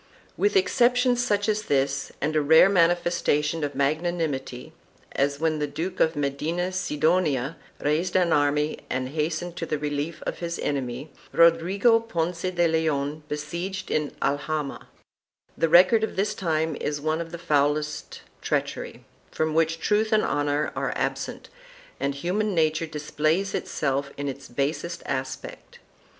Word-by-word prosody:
2 - - -12
With 410 +1 +3
exceptions 250 -7 +3
such 205 -3 +1
as 215 0 +1
this, 140 -5 0
and 155 +3 -1
a 155 - +4
rare 160 +6 +7
manifestation 170 -4 +2
of 145 - -3
magnanimity, 145 -4 -2 0.4
as 140 +1 0
when 160 -1 0
the 150 - 0
Duke 170 +6 -4
of 160 - +3
Medina 150 +6 -1
Sidonia 155 -5 +1 0.2
raised 160 +5 0
an 180 -3 +3
army 150 +1 +1
and 130 0 -2
hastened 160 +3 -2
to 165 - -3
the 155 - -1
relief 150 +2 -3
of - - -3
his 170 -1 -3
enemy, 140 +1 -3 0.2
Rodrigo 180 +8 +4
Ponce 175 -6 -2
de 175 -2 +2
Leon 155 -2 0
besieged 170 +6 -4
in 150 -2 0
Alhama,3 145 +1 -2 0.7
the 165 - +1
record 185 +7 +6
of 220 - -2
the 195 - +2
time 160 -6 -1
is 145 -1 -2
one 155 +2 -1
of 165 -1 -7
the 170 - -5
foulest 150 -2 -1 0.2
treachery, - - -3 0.2
from 155 0 -1
which 165 +1 +1
truth 215 +4 +1
and 215 -1 +4
honor 145 +1 0
are - - -1
absent - - -3 0.5
and 140 0 -1
human 190 +7 -1
nature 160 0 +1
displays 155 +5 -1
itself 140 -1 -1
in 145 0 -3
its 140 0 -6
basest 150 +7 -3
aspect. 130 -1 -5
155 Hz, 145 wpm, -25 LUFS, 145-175 Hz, 0.7 s, rare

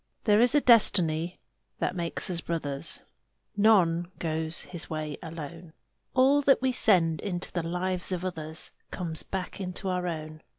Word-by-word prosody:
There 210 -1 +4
is 245 +3 +7
a 295 - +5
destiny 175 - +3 0.4
that - - -2
makes 170 -2 -1
us 170 -1 -2
brothers: 150 -3 -2 0.5
None 180 -5 +4
goes 160 0 -2
his 175 -3 -2
way 155 -2 -4
alone: 165 0 -8 0.4
All 270 +3 +5
that 275 -1 +4
we 260 0 +1
send 175 -10 +3
into 180 -3 -4
the 175 - -2
lives 180 +2 -2
of 180 0 -3
others 160 -3 -3 0.2
Comes 165 -4 -2
back 190 0 -5
into 185 +1 -4
our 180 -1 -1
own. 155 -2 -6
175 Hz, 155 wpm, -28 LUFS, 160-195 Hz, 0.5 s, is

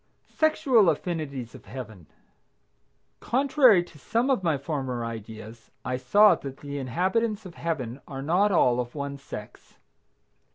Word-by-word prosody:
SEXUAL 265 - +3
AFFINITIES 150 -7 -3
OF - - -13
HEAVEN. 110 - -9 1.1
Contrary 255 - +4
to 165 -3 -17
some 235 - 0
of 255 - +1
my 165 -5 +1
former 135 -4 -3
ideas 110 0 -9 0.2
I 125 +1 -1
saw 205 +12 +5
that 135 -1 -6
the 145 0 -6
inhabitants 190 - -1
of 180 - -9
Heaven 140 -8 -4
are 135 -1 -6
not 185 +7 +2
all 125 -9 +3
of 120 +2 -4
one 140 -1 -5
sex. 140 - -10
145 Hz, 135 wpm, -26 LUFS, 125-200 Hz, 1.1 s, saw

